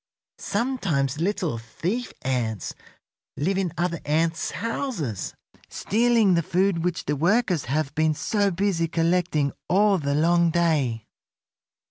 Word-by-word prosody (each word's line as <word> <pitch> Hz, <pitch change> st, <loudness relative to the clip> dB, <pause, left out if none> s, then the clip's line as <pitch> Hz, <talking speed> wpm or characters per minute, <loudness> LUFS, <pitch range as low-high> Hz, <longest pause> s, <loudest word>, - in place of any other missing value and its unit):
Sometimes 195 Hz, -, -1 dB
little 175 Hz, -, -1 dB
thief 180 Hz, -, -3 dB
ants 120 Hz, -6 st, -2 dB, 0.6 s
live 185 Hz, +7 st, 0 dB
in 185 Hz, -3 st, -1 dB
other 170 Hz, -1 st, -1 dB
ants' 160 Hz, +2 st, 0 dB
houses, 205 Hz, -, -3 dB, 0.3 s
stealing 225 Hz, -2 st, +2 dB
the 170 Hz, -, +3 dB
food 180 Hz, +1 st, +1 dB
which 180 Hz, -1 st, -2 dB
the 145 Hz, -, 0 dB
workers 180 Hz, -, +1 dB
have 140 Hz, +2 st, -1 dB
been 155 Hz, 0 st, +1 dB
so 205 Hz, +5 st, +1 dB
busy 185 Hz, -2 st, 0 dB
collecting 165 Hz, -3 st, +1 dB, 0.2 s
all 200 Hz, +1 st, +4 dB
the 140 Hz, -1 st, -1 dB
long 170 Hz, +2 st, +3 dB
day." 150 Hz, -10 st, +1 dB
170 Hz, 120 wpm, -25 LUFS, 150-195 Hz, 0.6 s, all